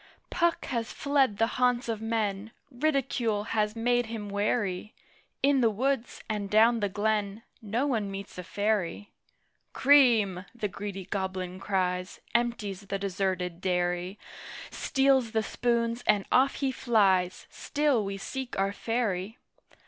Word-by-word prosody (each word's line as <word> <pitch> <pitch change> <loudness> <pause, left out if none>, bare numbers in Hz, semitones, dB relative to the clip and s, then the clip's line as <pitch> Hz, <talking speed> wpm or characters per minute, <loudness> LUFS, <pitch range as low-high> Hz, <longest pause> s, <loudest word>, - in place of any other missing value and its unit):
Puck 340 -1 +1
has 235 -3 -3
fled 275 -7 +1
the 225 - +4 0.2
haunts 245 -1 +2
of 225 -2 -2
men: 220 -2 -1 0.2
Ridicule 245 -6 0
has 215 0 -1
made 240 +1 +1
him 220 -2 -5
wary: 205 -1 -1 0.5
In 275 -1 +4
the 230 - +5
woods, 250 +3 -1
and 210 -2 -3
down 225 +3 +5
the 205 -2 0
glen, 210 +1 -1 0.2
No 225 +5 -1
one 225 -8 0
meets 195 0 -7
a - - -5
Fairy! 205 +1 -1 0.6
"Cream!" 235 -10 +5
the 220 -3 -2
greedy 195 -1 -6
Goblin 185 -1 -3
cries 185 -2 -1
Empties 215 -5 -1
the 195 - -2
deserted 185 -3 -2
dairy 180 +1 -1 0.5
Steals 270 -4 +2
the 220 -1 +1
spoons, 235 +1 0
and 200 -2 +3
off 270 +2 +4
he 270 -2 0
flies. 195 -8 +2
Still 290 -6 0
we 195 0 -4
seek 260 +5 -5
our 195 +1 +1
Fairy! 220 -3 -2
215 Hz, 135 wpm, -28 LUFS, 195-240 Hz, 0.6 s, the